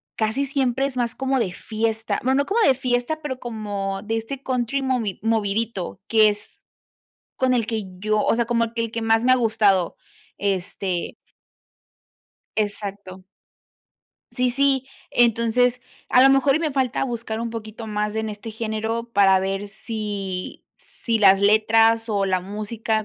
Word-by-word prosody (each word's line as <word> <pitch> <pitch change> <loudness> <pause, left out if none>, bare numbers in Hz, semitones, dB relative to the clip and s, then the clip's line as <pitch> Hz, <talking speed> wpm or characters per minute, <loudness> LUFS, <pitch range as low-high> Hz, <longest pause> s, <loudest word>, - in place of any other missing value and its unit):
casi 225 +6 0
siempre 270 -1 0
es 270 -2 -3
más 240 -2 -1
como 265 -1 0
de 185 -6 0
fiesta, 220 +2 -2
bueno, 265 +2 +2
no - - -11
como 445 +4 +1
de 275 - +5
fiesta, 255 +4 -1
pero 260 -4 -4
como 205 -4 -4
de 225 +1 -2
este 255 +5 -5
country 255 +1 -1
movi 250 -7 -1
movidito, 220 -3 -1
que 220 -1 +5
es 205 0 -7 0.8
con 255 -1 +2
el 230 -3 +1
que 220 -3 -2 0.2
yo, 215 +1 +1
o - - +2
sea, 235 - +1
como 230 0 0
que 230 - -1
el 230 - -3
que 230 - -3
más 225 +1 +2
me 255 - +5
ha - - +5
gustado, 205 -6 +2 0.4
este 190 -2 -2 1.4
Exacto. 200 -3 -4 1.1
Sí, 250 -1 +2
sí, 270 0 +2 0.2
entonces, 240 +1 +2 0.3
a 250 - +6
lo 270 - +7
mejor 270 0 +4
y - - +1
me 315 -2 -1
falta 265 -1 0
buscar 235 -3 -4
un 230 0 -3
poquito 225 0 -7
más 210 0 -2
en 220 0 -2
este 210 +2 -7
género 220 +1 -3
para 195 -1 +5
ver 195 +1 -3
sí 200 -4 -5
sí 230 -2 -2
las 195 -1 +6
letras 225 +2 +4
o 200 -2 +1
la 185 -1 +1
música 215 +2 -2
225 Hz, 160 wpm, -23 LUFS, 210-245 Hz, 1.4 s, lo